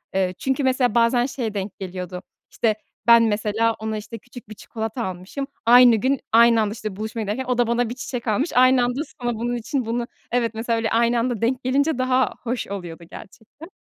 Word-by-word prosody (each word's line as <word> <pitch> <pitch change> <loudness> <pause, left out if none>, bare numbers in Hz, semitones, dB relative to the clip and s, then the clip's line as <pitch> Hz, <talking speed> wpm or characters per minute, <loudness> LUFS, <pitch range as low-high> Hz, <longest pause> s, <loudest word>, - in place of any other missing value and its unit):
Eee, 185 -1 0
çünkü 270 +2 -1
mesela 255 -3 +1
bazen 240 +1 +3
şeye 245 -5 -4
denk 200 -1 -5
geliyordu, 180 -1 -6 0.3
işte 225 -3 +1 0.3
ben 235 0 +8
mesela 220 +1 +1
ona, 220 0 -4
işte, 215 +2 -8
küçük 245 0 -14
bir 215 - -9
çikolata 225 +3 -5
almışım, 190 +9 -6 0.2
aynı 245 0 +7
gün, 260 +5 0
aynı 230 0 +6
anda, 210 -1 -1
işte, 215 -3 -6
buluşmaya 220 +2 -5
giderken 210 +6 -3
o 250 -1 -1
da 245 -1 +2
bana 235 0 0
bir 240 - -5
çiçek 250 -1 -6
almış, 245 +10 0
aynı 255 0 +5
anda 245 +3 -1 0.2
sonra 240 -1 -1
bunun 240 +2 -2
için 255 +2 -3
bunu 235 +1 -2 0.2
evet, 235 -2 0
mesela 230 +1 -1
öyle 225 -1 -1
aynı 235 +1 +2
anda 235 -2 -2
denk 250 +3 0
gelince 280 +3 +1
daha 255 0 +1
hoş 245 0 -3
oluyordu 175 -4 -7
gerçekten. 265 - -13
235 Hz, 200 wpm, -22 LUFS, 215-250 Hz, 0.3 s, ben